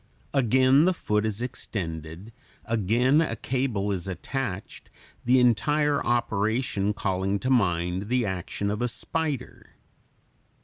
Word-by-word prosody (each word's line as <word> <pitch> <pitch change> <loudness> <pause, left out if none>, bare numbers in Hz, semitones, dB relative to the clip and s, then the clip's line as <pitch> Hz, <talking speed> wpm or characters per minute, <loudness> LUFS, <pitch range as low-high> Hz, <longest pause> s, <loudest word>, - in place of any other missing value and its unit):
Again 130 +3 +4
the 185 0 +2
foot 105 -7 0
is 110 +2 -3
extended, 90 -5 -5 0.3
again 115 - +2
a 155 -8 -1
cable 115 -4 -1
is 95 -2 -3
attached, 95 - -5 0.4
the 125 +2 +5
entire 145 +5 +2
operation 110 -2 0
calling 95 -2 -1
to 130 +6 -2
mind 90 -4 +1
the 125 0 +1
action 95 +1 -3
of 105 +2 -3
a 120 - +1
spider. 145 +2 -4
115 Hz, 120 wpm, -26 LUFS, 100-130 Hz, 0.4 s, the